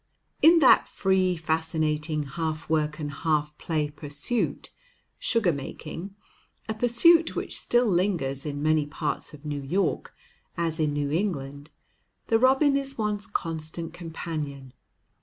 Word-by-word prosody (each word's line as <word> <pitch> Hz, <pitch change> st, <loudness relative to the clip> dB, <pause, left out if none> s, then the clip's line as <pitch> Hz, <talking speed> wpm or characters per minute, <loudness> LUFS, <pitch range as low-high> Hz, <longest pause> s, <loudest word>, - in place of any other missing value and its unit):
In 335 Hz, +2 st, +8 dB
that 260 Hz, -, +6 dB
free, 185 Hz, -2 st, +1 dB
fascinating, 155 Hz, -1 st, -1 dB
half 155 Hz, +2 st, -4 dB
work 155 Hz, -1 st, +1 dB
and 150 Hz, -2 st, -4 dB
half 150 Hz, 0 st, -1 dB
play 150 Hz, -3 st, -1 dB
pursuit, 145 Hz, +10 st, -3 dB, 0.5 s
sugar 215 Hz, -8 st, +1 dB
making, 160 Hz, +7 st, -7 dB, 0.5 s
a 220 Hz, -, -1 dB
pursuit 245 Hz, +9 st, +4 dB
which -, -, -2 dB
still 240 Hz, +1 st, +2 dB
lingers 175 Hz, -, 0 dB
in 145 Hz, -1 st, -4 dB
many 155 Hz, -1 st, +2 dB
parts 150 Hz, 0 st, -3 dB
of 150 Hz, +1 st, -17 dB
New 145 Hz, -1 st, -3 dB
York, 170 Hz, +5 st, -1 dB, 0.4 s
as 165 Hz, -1 st, -1 dB
in 155 Hz, -2 st, +2 dB
New 145 Hz, -1 st, -1 dB
England, 145 Hz, -5 st, -2 dB, 0.6 s
the 225 Hz, -, +4 dB
robin 270 Hz, +3 st, +4 dB
is 275 Hz, 0 st, -3 dB
one's 210 Hz, -2 st, -2 dB
constant 165 Hz, -2 st, -4 dB
companion. 155 Hz, -6 st, -6 dB
160 Hz, 130 wpm, -26 LUFS, 150-200 Hz, 0.6 s, In